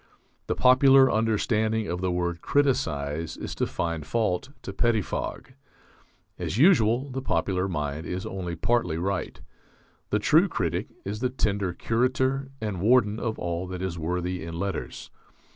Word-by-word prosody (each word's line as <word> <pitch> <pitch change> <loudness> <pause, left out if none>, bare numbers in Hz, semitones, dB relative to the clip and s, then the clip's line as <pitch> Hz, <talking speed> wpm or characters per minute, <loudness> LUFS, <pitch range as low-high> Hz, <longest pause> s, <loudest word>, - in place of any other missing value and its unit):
The - - 0
popular 130 +1 +6
understanding 110 0 +1
of 90 +1 -3
the 95 -1 0
word 85 -1 -2
criticize 85 - 0
is - - -5
to - - -1
find 85 -2 -3
fault, 110 - -1
to 95 - -6
pettifog. 115 +3 -1 0.9
As - - -3
usual, 130 - +4
the 135 +1 -3
popular 90 -3 0
mind 75 -2 -3
is 90 +1 -4
only 90 -3 -4
partly 100 -1 0
right. 95 +2 -3 0.7
The - - +2
true - - +4
critic - - -2 0.2
is 105 +2 -4
the 125 +1 0
tender 100 -7 -1
curator 130 +5 0
and 105 -5 -3
warden 110 -1 +3
of 110 -2 -2
all 85 +1 -3
that 90 0 -5
is 90 -3 -3
worthy 90 +2 -2
in 85 0 -6
letters. 100 -1 -4
100 Hz, 145 wpm, -26 LUFS, 85-120 Hz, 0.9 s, popular